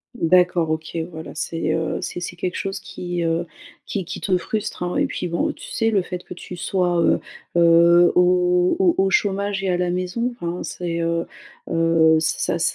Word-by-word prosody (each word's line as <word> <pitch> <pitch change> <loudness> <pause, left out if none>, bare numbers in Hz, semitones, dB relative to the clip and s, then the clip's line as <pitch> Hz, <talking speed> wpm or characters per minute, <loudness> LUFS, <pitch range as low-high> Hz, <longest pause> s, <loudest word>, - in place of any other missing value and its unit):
D'accord. 175 -3 +3
OK, 160 +1 -4
voilà, 160 -1 -8
c'est, 160 0 -2
heu, 160 0 -2
c'est - - -4
c'est 175 - -5
quelque 180 +1 -3
chose 195 0 -3
qui, 175 -2 -5
heu, 165 +1 0 0.4
qui 195 -3 -3
qui 175 - -6
te 190 - +1
frustre, 210 +2 -4
hein. 180 0 -2
Et - - +3
puis 180 - -4
bon, 170 0 0
tu - - -11
sais, 225 -1 +1
le 200 -3 +3
fait 180 0 -6
que - - -9
tu 180 0 -9
sois, 175 0 0
heu - - +3 0.4
heu, 170 +1 +6
au 180 - +3
au 365 -3 +4
au 195 0 +3
chômage 200 0 0
et 190 - 0
à 180 - +1
la 180 -1 0
maison, 185 +7 -2
enfin, 175 +1 -3
c'est, 170 -1 -3
heu 170 0 0 0.4
heu, 165 -1 +4
ça 160 +1 0
ç - - -5
175 Hz, 200 wpm, -22 LUFS, 170-185 Hz, 0.4 s, heu